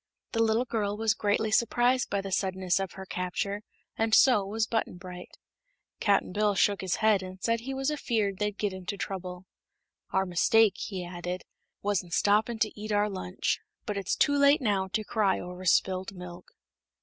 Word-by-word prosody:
The 225 - 0
little 225 +2 +2
girl 210 -4 -2
was 220 0 +2
greatly 215 +1 0
surprised 245 +2 +2
by 200 - 0
the 195 0 -6
suddenness 185 -1 0
of 195 -2 -4
her 190 - -8
capture, 190 +3 -3 0.3
and 225 0 +2
so 250 -7 +6
was 215 +3 -1
Button 220 -4 -2
Bright. 180 -1 -10 0.6
Cap'n 200 -3 +2
Bill 210 0 +2
shook 200 +1 +2
his 190 -2 -1
head 215 -3 +3
and 185 0 -8
said 230 +3 0
he 265 +4 -5
was 270 +2 0
afeared 220 -9 -1
they'd 210 -1 -1
get 205 -2 -1
into 190 +2 -5
trouble. 185 -2 -5 0.6
"Our 190 0 +1
mistake," 205 +4 +3
he 185 -3 -5
added, 175 +1 -5 0.4
"was 205 -3 +1
in 175 - -15
stoppin' 210 +6 +2
to 215 -1 -1
eat 215 0 -4
our 205 0 +2
lunch. 185 -1 -2 0.3
But 210 - -3
it's 200 -2 -1
too 285 - +3
late 280 +1 +6
now 200 -6 0
to 215 +3 -2
cry 205 -3 +1
over 180 +1 -8
spilt 185 +2 +2
milk." 180 -1 -10
200 Hz, 185 wpm, -28 LUFS, 185-220 Hz, 0.6 s, so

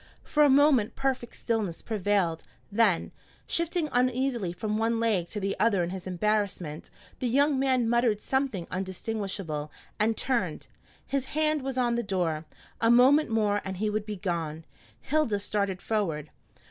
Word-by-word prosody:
For 300 - +1
a 295 - +7
moment 270 -5 +4
perfect 265 -3 -2
stillness 215 -7 -2
prevailed, 200 -6 0 0.3
then, 205 -5 +2 0.3
shifting 335 -1 0
uneasily 250 -5 +1
from 210 +4 -2
one 225 +1 +1
leg 210 -7 +1
to 210 - -5
the 195 0 -1
other 205 -5 +3
in 170 - -3
his 190 -1 -6
embarrassment, 185 -4 -1 0.3
the 255 - -1
young 280 +3 +3
man 260 -3 +2
muttered 235 -2 +2
something 265 -8 -1
undistinguishable, 190 -5 -3 0.3
and 220 +1 +2
turned. 185 - -1 0.4
His 275 -1 -1
hand 310 -1 +2
was 265 -1 -4
on 240 -2 +2
the - - +1
door, 175 -7 -1 0.3
a 230 - +3
moment 260 +5 +6
more 210 -2 +1
and 190 -1 -5
he 210 +2 0
would 215 0 -2
be 210 - -3
gone. 165 -4 -3 0.4
Hilda 295 -8 +1
started 200 -2 -2
forward. 165 -9 -1
215 Hz, 155 wpm, -28 LUFS, 185-250 Hz, 0.4 s, a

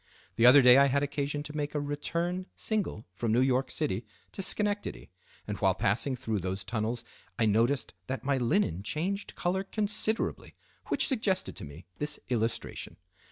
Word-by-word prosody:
The 115 - +6
other 135 +2 +9
day 125 +2 +9
I 140 - +6
had 140 +1 +1
occasion 145 0 -2
to 150 - -8
take 150 0 -3
a - - +2
return 170 +6 -2
single 210 - -2
from 110 +3 -1
New 115 - +4
York 130 0 +2
City 125 -9 -1 0.3
to - - -5
Schenectady; 205 +2 -1 0.3
and - - -4
while - - +3
passing 125 +7 +1
through 110 -4 -2
those 95 +2 -3
tunnels 115 +1 -2 0.3
I 115 - +3
noticed 115 +5 +2
that 130 - -3
my 140 -1 +1
linen 120 - +1
changed 185 - -3
color 185 +2 0
considerably, 215 +2 -2 0.3
which - - +3
suggested 215 -8 0
to - - -6
me 75 +4 -11
this 150 0 -1
illustration. 115 -2 -2
140 Hz, 165 wpm, -30 LUFS, 115-175 Hz, 0.3 s, other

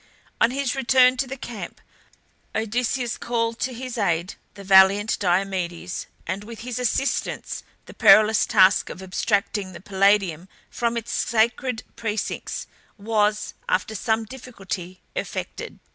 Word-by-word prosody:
On 230 - +6
his 270 0 -1
return 260 -1 +5
to 265 - -1
the 270 +2 -6
camp 235 -4 -7 0.8
Odysseus 235 +2 -1
called 230 -1 -1
to 260 - -1
his 250 0 -6
aid 175 -2 0 0.2
the 200 - -10
valiant 195 +2 +5
Diomedes, 180 -2 -1 0.2
and 190 +3 -3
with 225 +1 -9
his 250 0 -4
assistance 250 +3 -1 0.2
the - - -12
perilous 215 0 +6
task 195 -3 +4
of 190 - -8
abstracting 200 0 -1
the - - -9
Palladium 195 -3 +1 0.2
from 235 0 -1
its 230 - -5
sacred 235 +1 0
precincts 220 -2 -3 0.3
was, 210 0 0 0.2
after 185 +4 0
some 220 +2 0
difficulty, 195 -7 -7
effected. - - -5
215 Hz, 130 wpm, -24 LUFS, 190-240 Hz, 0.8 s, On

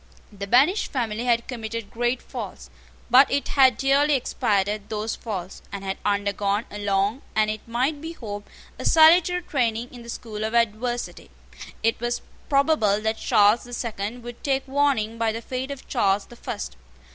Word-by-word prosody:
The 200 0 -6
banished 280 - +3
family 235 -3 -2
had 235 -1 +2
committed 230 -3 -5
great 240 +2 -1
faults; - - -8 0.4
but 260 +3 +7
it 285 - -1
had 260 -5 +5
dearly 280 +2 +3
expiated 205 -4 0
those 215 +1 -2
faults, 190 -5 -6
and 200 -1 -6
had 190 0 -3
undergone 200 +1 0
a 205 - -6
long, 200 +5 +1
and, 215 0 +3
it 215 +1 -7
might 260 +6 -1
be 325 +1 -6
hoped, 205 -8 -7 0.3
a - - -5
salutary 345 +2 +6
training 240 -5 -1
in 245 - -10
the 235 - -11
school 215 -2 -6
of 220 +2 -2
adversity. 235 +1 -1 0.5
It 225 +1 +2
was 240 +1 -2 0.3
probable 275 -8 +3
that 220 +1 -1
Charles 210 +2 +4
the 245 - -11
Second 230 0 -4
would 240 0 -9
take 270 -1 0
warning 265 -6 +1
by 225 -1 +2
the 225 - -4
fate 255 +3 -4
of 280 -1 -8
Charles 195 0 +1
the 240 - -14
First. 235 - -6
230 Hz, 170 wpm, -24 LUFS, 210-265 Hz, 0.5 s, but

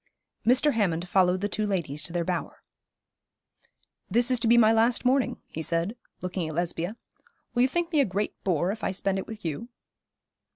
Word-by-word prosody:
Mr. 260 +5 +4
Hammond 180 -6 0
followed 185 0 +3
the 205 - +1
two 210 +1 -1
ladies 160 -7 -2
to 160 - -4
their 175 0 -1
bower. 180 -1 -4 1.5
'This 240 +5 +3
is 250 - +3
to 230 - +1
be 235 +1 +6
my 220 -1 +6
last 230 +3 +2
morning,' 260 +1 +2
he 160 - -6
said, 170 +6 -1 0.3
looking 180 -2 -2
at 155 - -6
Lesbia. 175 +4 -2 0.6
'Will 245 - +2
you 255 - +5
think 345 +4 -2
me 310 - +3
a 280 - +5
great 200 +1 -2
bore 175 0 +1
if 215 +1 -7
I - - +1
spend 195 0 -1
it - - -6
with 220 -4 -9
you?' 165 +10 -4
200 Hz, 195 wpm, -27 LUFS, 175-235 Hz, 1.5 s, be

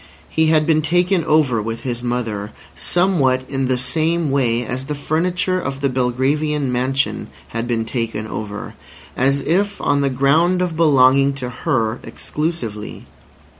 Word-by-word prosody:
He 160 0 +2
had 155 -1 +3
been 155 -1 +3
taken 175 +3 +2
over 145 -7 +2
with 115 +2 -4
his 120 -1 -3
mother, 115 -4 -3 0.2
somewhat 140 -9 +1
in 135 -1 -1
the 130 0 +1
same 160 +4 0
way 120 -3 +1
as 130 +3 -4
the 150 - -3
furniture 180 +5 0
of 140 -3 -4
the 140 - +2
Belgravian 130 +3 0
mansion 130 +2 -1 0.2
had 115 +1 -3
been 115 -2 -1
taken 115 -3 -3
over, 105 -1 -6 0.4
as 140 +2 +2
if 200 +7 0
on 145 0 +1
the 140 - +2
ground 145 +8 +3
of 180 -3 -1
belonging 140 -3 +4
to 130 -2 -5
her 120 -5 -1
exclusively. 125 -10 -5
135 Hz, 150 wpm, -19 LUFS, 125-155 Hz, 0.4 s, belonging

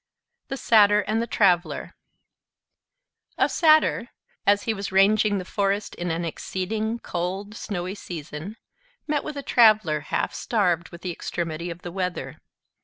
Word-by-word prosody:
THE 270 - -4
SATYR 210 -4 +5
AND 215 +2 -1
THE 235 - -2
TRAVELER 180 -6 +1 1.4
A - - +4
Satyr, 310 -7 +3 0.4
as 205 0 +4
he 225 - 0
was 200 -2 -5
ranging 205 +2 +4
the 185 - -4
forest 200 +2 -1
in 175 0 -4
an 165 +1 -2
exceeding 215 +7 -3
cold, 190 0 -4
snowy 185 -4 -4
season, 170 +1 -7 0.5
met 295 -2 -1
with 300 -2 -6
a 280 - -4
Traveler 215 - +4
half 145 - -2
starved 180 -7 0
with 170 - -12
the 180 - -2
extremity 170 0 -4
of 170 +1 -8
the 175 - -6
weather. 180 -1 -4
195 Hz, 145 wpm, -24 LUFS, 175-215 Hz, 1.4 s, SATYR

